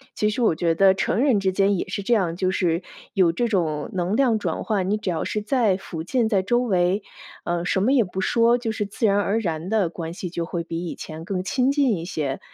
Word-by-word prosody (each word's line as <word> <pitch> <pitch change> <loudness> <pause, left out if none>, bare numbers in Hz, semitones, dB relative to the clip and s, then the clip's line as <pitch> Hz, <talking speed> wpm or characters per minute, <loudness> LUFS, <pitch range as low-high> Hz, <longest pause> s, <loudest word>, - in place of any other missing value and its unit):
其 210 - +1
实 215 +4 -2
我 220 -8 +3
觉 165 0 +1
得 195 +2 +5
成 190 +3 0
人 260 -7 +3
之 190 -1 +1
间 195 +1 +2
也 - - -3
是 - - -3
这 240 - +1
样， 180 -7 +1
就 185 0 +1
是 175 -2 0 0.3
有 185 -5 +4
这 240 +7 0
种 160 -8 -1
能 185 +2 -1
量 245 -3 +3
转 - - -3
换， 195 -4 -1
你 205 - +2
只 215 -3 -4
要 165 -3 -1
是 210 - -2
在 215 -2 +2
附 165 -4 -7
近 230 +6 +1
在 200 -4 +2
周 240 +6 +1
围， 190 -3 +1 0.4
呃， 175 0 -1
什 190 - +1
么 245 - +3
也 255 -4 +5
不 185 +1 -6
说， 235 +4 +3
就 235 -2 -3
是 215 -1 -2
自 205 +3 -2
然 200 -1 +3
而 205 +2 +1
然 165 -5 -3
的 210 -5 +1
关 165 -1 -6
系 180 0 -5
就 170 -1 -3
会 170 0 -3
比 165 +1 -5
以 - - -5
前 160 +1 -8
更 185 0 -2
亲 255 +7 +1
近 280 -6 +2
一 165 - -6
些。 145 -6 -3
195 Hz, 275 characters per minute, -23 LUFS, 175-220 Hz, 0.4 s, 得